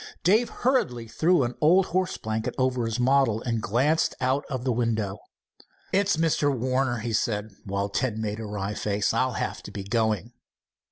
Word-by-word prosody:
Dave 220 +6 +4
hurriedly 125 - 0
threw 165 +6 +2
an 120 0 -2
old 180 +5 +5
horse 185 0 -1
blanket 110 +1 -3
over 130 -2 +1
his 115 +2 -2
model 130 -3 +3
and 115 -2 -1
glanced 135 +11 +1
out 130 +3 +1
of 130 -3 -3
the 130 - +1
window. 110 -4 -1 0.7
"It's 200 -3 +2
Mr. 160 -3 +2
Warner," 130 0 0
he 115 0 -3
said, 105 0 -1
while 100 +1 -2
Ned 120 -5 -1
made 110 -1 -3
a 110 - -5
wry 105 0 -3
face. 105 -1 0
"I'll 130 -1 +1
have - - -3
to - - -9
be 100 - -6
going." 110 +1 0
120 Hz, 175 wpm, -26 LUFS, 110-140 Hz, 0.7 s, old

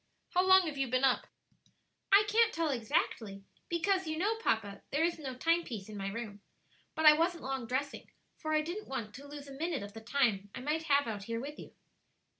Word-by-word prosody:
How 360 - +3
long 375 0 +6
have 295 -4 -4
you 270 - +1
been 255 +2 0
up?" 265 -2 +3 0.8
"I 400 +1 +8
can't 455 +2 +4
tell 330 -6 0
exactly; 220 -4 -1 0.3
because, 365 +1 +1
you 315 0 -2
know, 415 +6 +1
papa, 205 - -1
there 290 +3 +1
is 340 -1 0
no 265 -4 -5
time 335 +6 +2
piece 215 -8 -7
in 215 - -8
my 195 -1 -4
room. 205 -1 -6 0.5
But 315 0 0
I 305 - +11
wasn't 335 +3 0
long 265 -3 -3
dressing; 265 +4 -3 0.3
for 310 - -5
I 310 0 +3
didn't 355 +7 -5
want 230 -6 -4
to 280 +2 -10
lose 285 0 -9
a 275 - -9
minute 320 -4 -2
of 205 0 -9
the 225 - -9
time 220 -5 +1
I - - -5
might 305 +5 -1
have 285 -2 +3
out 205 -3 -4
here 230 +1 -3
with 290 +4 -7
you." - - -11
280 Hz, 220 wpm, -32 LUFS, 230-330 Hz, 0.8 s, I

